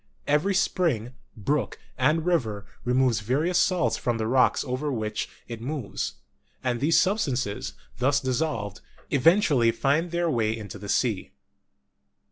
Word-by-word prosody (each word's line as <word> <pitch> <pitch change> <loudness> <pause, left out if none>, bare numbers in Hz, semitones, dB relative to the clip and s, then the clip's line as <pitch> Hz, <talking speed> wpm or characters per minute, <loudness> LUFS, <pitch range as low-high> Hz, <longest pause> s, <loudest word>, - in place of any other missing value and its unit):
Every 150 +7 +2
spring, 130 - +1 0.2
brook, 135 +7 -1 0.2
and 160 +2 +2
river 110 - 0 0.2
removes 125 -2 +2
various 145 - +1
salts 130 -12 +2
from 120 -2 -1
the 110 - -1
rocks 125 +2 +3
over 135 +3 -2
which 110 -3 -3 0.2
it 115 -2 -7
moves, 130 -3 -4 0.5
and 125 -2 0
these 150 +5 +4
substances, 135 - 0 0.3
thus 135 +3 +3
dissolved, 130 -7 -2 0.3
even 165 +8 +5
tually 125 - +3
find 140 +9 +1
their 170 0 0
way 115 -7 +1
into 105 -2 -8
the 100 0 -8
sea. 110 -5 0
130 Hz, 135 wpm, -26 LUFS, 115-155 Hz, 0.5 s, even